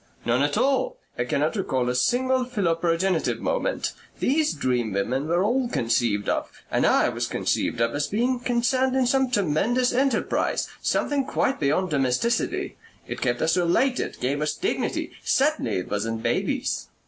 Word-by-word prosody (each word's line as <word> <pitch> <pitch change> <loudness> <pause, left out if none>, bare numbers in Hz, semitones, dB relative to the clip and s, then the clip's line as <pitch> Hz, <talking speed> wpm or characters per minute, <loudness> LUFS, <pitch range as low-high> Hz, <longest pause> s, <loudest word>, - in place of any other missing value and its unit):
"None 120 +3 +2
at 145 +6 +1
all. 275 - +1 0.2
I 120 - -1
cannot 145 - 0
recall 130 - -1
a 125 - +1
single 255 - +2
philoprogenitive 175 -5 0
moment. - - -1 0.3
These 300 +3 +2
dream 125 -6 -1
women 125 +9 -1
were 175 +3 +2
all 245 +4 +1
conceived 115 - 0
of, - - -1 0.2
and - - +2
I - - +4
was - - -2
conceived - - -1
of, 115 0 +1
as 145 0 -1
being 245 +4 0
concerned 255 +2 +1
in 260 -1 +3
some 265 +1 +2
tremendous 240 +5 +1
enterprise 265 0 +1
something 285 -1 +1
quite 265 - 0
beyond 155 +5 +1
domesticity. 140 - 0 0.3
It - - -6
kept 120 +1 0
us 160 +1 +2
related 185 +9 +1
gave 140 +4 -1
us 150 0 0
dignity.... 385 - -2
Certainly 300 +3 +1
it 90 - -4
wasn't 110 +2 -2
babies." 120 0 -1
180 Hz, 155 wpm, -25 LUFS, -, 0.3 s, I